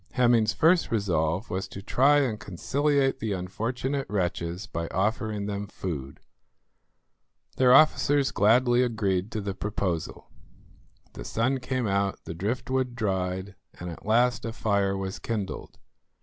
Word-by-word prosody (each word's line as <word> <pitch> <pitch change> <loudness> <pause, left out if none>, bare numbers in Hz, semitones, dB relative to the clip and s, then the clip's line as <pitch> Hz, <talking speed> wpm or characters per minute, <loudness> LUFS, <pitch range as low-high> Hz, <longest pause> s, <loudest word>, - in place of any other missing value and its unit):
Hemming's 120 -4 +3
first 165 +7 +3
resolve 90 -3 0
was 95 +2 -2
to 100 +1 -9
try 145 +6 +4
and 115 -6 -1
conciliate 135 - 0
the 110 -2 -2
unfortunate 120 +9 -3
wretches 90 -1 -2
by 85 -4 -4
offering 105 +2 -1
them 100 0 -4
food. 75 -9 -6 1.4
Their 130 -1 +5
officers 145 -2 +4
gladly 120 +4 +4
agreed 105 -5 0
to 110 - -2
the 100 -1 -3
proposal. 95 -5 -3 0.8
The - - -8
sun 125 - 0
came 130 -1 -2
out, 100 -1 0
the - - -5
driftwood 125 +7 -2
dried, 95 -3 -2 0.3
and 90 0 -5
at 85 - -11
last 120 +2 +2
a 115 - -3
fire 100 -3 0
was 95 +1 -4
kindled. 105 -4 -5
105 Hz, 135 wpm, -27 LUFS, 95-125 Hz, 1.4 s, Their